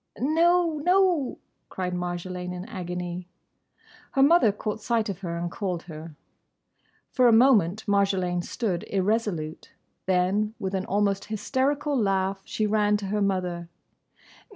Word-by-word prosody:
"No, 330 +3 +3
no!" 360 -6 +2 0.3
cried 180 -1 -3
Marjolaine, 180 0 -4
in 180 +1 -6
agony. 180 -4 -5 0.9
Her 270 - +4
mother 285 -7 +5
caught 210 +1 -4
sight 225 -1 0
of 195 -2 -4
her 170 -3 -4
and 170 0 -3
called 180 -4 -3
her. 160 -2 -10 1.0
For 255 -2 +4
a - - +6
moment 220 -5 +4
Marjolaine 195 -3 +1
stood 185 -6 -2
irresolute. 195 -5 -2 0.3
Then, 190 +4 +1
with 190 0 -4
an 190 0 -1
almost 200 0 0
hysterical 275 +7 -1
laugh, 195 -4 0
she 215 - -1
ran 210 0 +2
to 205 - -6
her 210 +1 0
mother. 180 -3 -1
200 Hz, 130 wpm, -26 LUFS, 180-230 Hz, 1.0 s, a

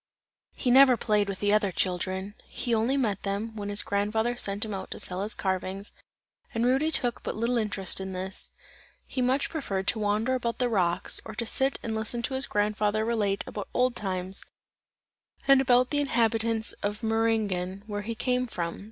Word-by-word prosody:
He 250 - 0
never 260 -1 +7
played 210 -3 +1
with 195 - -5
the 205 0 +3
other 210 -2 +2
children; 185 +2 -2
he 240 -2 -2
only 230 +5 +2
met 210 -7 0
them, 210 +3 -3
when 205 -1 -4
his 205 0 +1
grandfather 220 +4 0
sent 205 -2 -1
him 215 - -5
out 190 - -5
to - - -6
sell 180 +1 +2
his 210 +2 0
carvings, 190 +1 -2 0.6
and 230 +1 +1
Rudy 265 +5 +3
took 245 -6 +1
but - - -4
little 235 +2 +1
interest 200 -3 0
in 190 0 -5
this; 185 +1 -5 0.5
he 260 - -3
much 260 +3 +1
preferred 195 - -2
to 225 - 0
wander 215 +4 +1
about 235 -2 -1
the 250 -1 +1
rocks, 180 -6 +2
or 220 - -8
to 235 - -2
sit 270 +4 +2
and 225 - -2
listen 220 +2 -2
to 265 - -2
his 265 +1 +2
grandfather 210 +1 +1
relate 210 -4 0
about 205 - -6
old 250 0 +2
times 190 -1 -2 1.0
and 275 -1 +7
about 255 -1 +3
the 290 - +1
inhabitants 225 -4 +1
of 205 +2 -3
Meiringen, 215 -4 0
where 205 -1 -4
he 225 +2 -4
came 250 +2 0
from. 170 -6 -4
220 Hz, 185 wpm, -28 LUFS, 200-240 Hz, 1.0 s, never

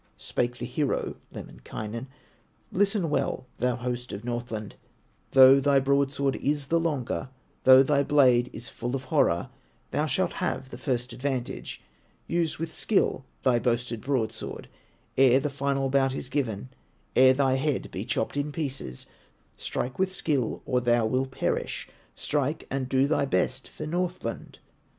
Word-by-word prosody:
Spake 120 0 -2
the 120 - -4
hero, 135 +3 -1
Lemminkainen: 115 +4 -7 0.6
"Listen 195 -4 +1
well, 140 - -1
thou 125 -1 +1
host 125 0 -4
of 100 +3 -6
Northland, 120 -3 -4 0.6
Though 135 +1 +9
thy 140 0 +4
broadsword 140 0 +1
is 145 -1 -1
the 170 - +3
longer, 135 - -2 0.4
Though 130 0 +9
thy 140 +1 +3
blade 130 -4 +4
is 115 +2 -7
full 125 +2 -4
of 135 - -4
horror, 85 - +2 0.4
Thou - - 0
shalt - - 0
have 130 - -2
the 125 - -8
first 125 -2 -2
advantage; 130 0 -4 0.4
Use 170 -1 0
with 165 0 -4
skill 195 -10 +1 0.2
thy 125 -3 +4
boasted 120 -1 -1
broadsword 115 -5 -3 0.5
Ere 130 -1 +6
the 145 +1 -2
final 140 -1 0
bout 135 0 +2
is 130 - -4
given, 130 -5 -2 0.5
Ere 130 +1 +7
thy 135 -1 +3
head 135 +1 -1
be - - -4
chopped - - -2
in 145 +1 -1
pieces; 135 - -4 0.5
Strike 125 +5 -4
with 190 0 +2
skill, 145 -10 -1
or 125 -2 +1
thou 120 -1 +3
wilt 130 +4 0
perish, 130 - -2 0.3
Strike, 145 +1 -1
and 135 -1 -2
do 135 0 +3
thy 145 -1 +1
best 130 -1 0
for 155 - -7
Northland." 180 +3 -3
130 Hz, 150 wpm, -27 LUFS, 125-145 Hz, 0.6 s, Though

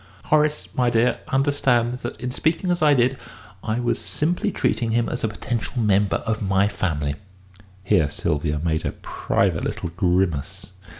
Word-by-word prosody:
"Horace, 150 0 +2
my 125 -1 +2
dear, 120 +1 +2
understands 130 -3 +1
that, - - -6
in 125 0 -3
speaking 165 +6 0
as 175 - 0
I 150 -2 +5
did, 130 +1 +2 0.4
I 110 +2 -1
was 120 -1 0
simply 175 +6 -1
treating 115 -9 0
him 115 +1 +1
as 125 - -4
a - - +3
potential 115 +2 -4
member 105 -2 +2
of 110 -1 -1
my 95 0 +2
family." 80 -8 -2 0.7
Here 95 -7 +3
Sylvia 75 +1 -1
made 80 -2 0
a - - -2
private - - -1
little 85 - -3
grimace. 90 -4 0
115 Hz, 160 wpm, -23 LUFS, 95-130 Hz, 0.7 s, I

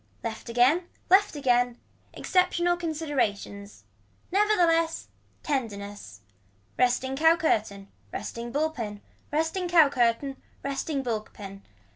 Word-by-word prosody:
Left 225 +1 -5
again 260 +9 +3 0.2
left 400 -2 +5
again. 245 -3 +2 0.3
Exceptional 350 -1 +1
considerations. 285 -12 -3 0.5
Never 420 +3 +3
the 355 - +4
less 330 0 0 0.3
tenderness. 205 - -4 0.5
Resting 255 +1 +1
cow 320 +3 +5
curtain. 210 -11 -1 0.2
Resting 235 +1 -5
bull 310 +4 0
pin. 210 -8 -6 0.3
Resting 320 +5 0
cow 325 -4 +6
curtain. 260 +1 0 0.2
Resting 275 0 -2
bull 225 -4 -1
pin. 195 -1 -10
270 Hz, 110 wpm, -27 LUFS, 230-330 Hz, 0.5 s, cow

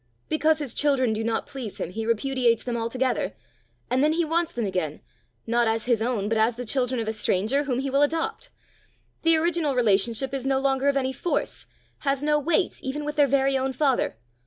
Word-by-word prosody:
Because 310 0 +3
his 285 -6 -3
children 265 -6 +2
do 220 +1 -2
not 225 0 -1
please 250 -7 -7
him, 170 - -4
he 220 +3 -4
repudiates 235 0 +1
them 245 -1 -3
altogether; 245 +2 -1 0.5
and 255 +2 +1
then 305 +1 +3
he 335 +1 +1
wants 330 +1 0
them 235 -2 -2
again 180 -6 -2 0.4
not 235 0 +2
as 225 0 0
his 240 -3 +2
own, 225 -4 -1
but 220 0 +1
as 225 +2 +2
the 245 +1 -6
children 250 +1 0
of 225 - -3
a 220 - -1
stranger, 215 +7 +1
whom 255 -3 -1
he 270 +1 -2
will 275 +1 +3
adopt! 325 +11 -1 0.7
The 330 -1 +4
original 320 -3 +1
relationship 230 +3 +2
is 270 -2 -2
no 270 0 +1
longer 270 0 +1
of 280 - +1
any 265 -1 0
force 350 - -2 0.3
has 275 -1 -1
no 300 0 +3
weight 340 +5 0
even 290 +3 -4
with 295 0 -3
their 290 -2 +4
very 270 0 +2
own 265 0 0
father! 265 - +1
265 Hz, 205 wpm, -25 LUFS, 230-290 Hz, 0.7 s, The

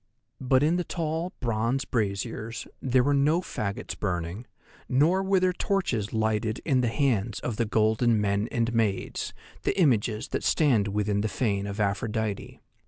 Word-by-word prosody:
But 130 +1 +3
in 165 +4 +3
the 180 - 0
tall, 165 +1 -3
bronze 115 +3 0
braziers 110 +1 -2 0.2
there 130 -1 +3
were 145 +2 +2
no 145 +4 +3
faggots 105 - -4
burning, 90 +3 -3 0.4
nor 160 +9 +3
were 195 0 +2
there 185 0 +2
torches 165 - -1
lighted 110 0 0
in 130 -5 +3
the 120 - +1
hands 115 -4 0
of 115 -4 -3
the 115 - +1
golden 110 +1 +2
men 100 +1 0
and 115 -1 0
maids, 110 -4 -1 0.3
the - - -1
images 115 - +2
that - - -2
stand 125 -10 +3
within 100 0 0
the 110 - 0
fane 100 -5 -1
of 100 +1 -5
Aphrodite. 105 +1 -2
115 Hz, 160 wpm, -27 LUFS, 105-140 Hz, 0.4 s, But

